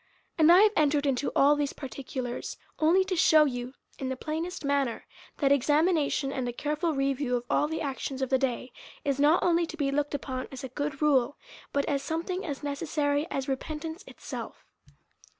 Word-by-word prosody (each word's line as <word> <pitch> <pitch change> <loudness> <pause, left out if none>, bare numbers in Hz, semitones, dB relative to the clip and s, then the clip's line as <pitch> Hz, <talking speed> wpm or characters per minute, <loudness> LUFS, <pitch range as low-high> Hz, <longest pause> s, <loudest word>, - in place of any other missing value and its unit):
And 315 -2 +4
1 350 +2 +9
have 430 - +5
entered 295 -1 +2
into 275 0 0
all 285 +2 +5
these 290 -1 -1
parti 275 0 -8
culars 250 -2 -5 0.2
only 335 +5 +4
to 375 -1 -2
shew 315 -2 +6
you, 250 -1 -4 0.2
in 265 - -3
the 260 - -2
plainest 320 +5 -4
manner, 280 -4 0 0.3
that 275 -2 +2
examination, 290 0 +2
and 255 -3 -2
a - - -2
careful 300 +5 -1
review 275 -2 0
of 240 - -2
all 295 - +3
the 320 +1 -3
actions 270 -1 -3
of 260 - -2
the 265 - +4
day, 255 -1 -2 0.3
is 280 -1 0
not 300 +4 +4
only 340 -1 +3
to 320 - -8
be 280 -3 0
looked 290 +1 -1
upon 260 -2 -4
as 265 -1 -8
a 265 - -5
good 290 +3 -3
rule, 275 -3 +3 0.3
but 280 0 0
as 280 -2 0
something 340 +6 -3
as 290 -5 -5
necessary 290 0 -1
as 270 -1 -3
repentance 310 +6 -4
itself. - - -8
285 Hz, 190 wpm, -28 LUFS, 270-310 Hz, 0.3 s, 1